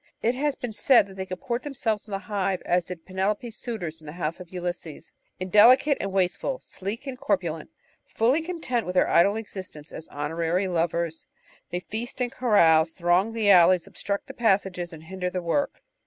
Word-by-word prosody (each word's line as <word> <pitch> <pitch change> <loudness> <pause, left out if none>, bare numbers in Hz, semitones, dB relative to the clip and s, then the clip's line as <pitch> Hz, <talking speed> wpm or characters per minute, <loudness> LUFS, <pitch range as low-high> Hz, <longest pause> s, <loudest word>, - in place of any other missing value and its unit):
It 235 - +3
has 285 +2 -1
been 245 -3 -5
said 235 0 +5
that 195 -1 -13
they 190 0 -5
com 185 0 -5
port 240 +2 -3
themselves 230 -7 -2
in - - -12
the 195 - -1
hive 195 -1 -2
as 175 -1 +2
did 175 -2 -8
Penelope's 205 +4 -2
suitors 180 -12 -5
in 155 - -15
the 150 - -7
house 170 -1 -3
of 180 -2 -10
Ulysses: 175 -3 -6 0.3
"Indelicate 230 - +5
and 195 - -3
wasteful, 190 - 0
sleek 205 - -6
and 260 -2 -6
corpulent, 175 -6 -1 0.4
fully 250 +8 +2
content 315 - -2
with 180 - -4
their - - +4
idle 195 +5 +4
existence 185 -8 -8
as 160 - -8
honorary 165 +5 -1
lovers, 170 -2 -1 0.4
they 175 - -2
feast 235 +7 -6
and 245 -1 -1
carouse, 165 -9 +4
throng 180 +5 +2
the 215 -3 +3
alleys, 180 -1 +6
obstruct 200 0 -4
the - - -9
passages, 190 -6 0
and 160 -1 -11
hinder 180 +2 -4
the 180 - -3
work." 180 +12 -1
190 Hz, 185 wpm, -26 LUFS, 175-225 Hz, 0.4 s, alleys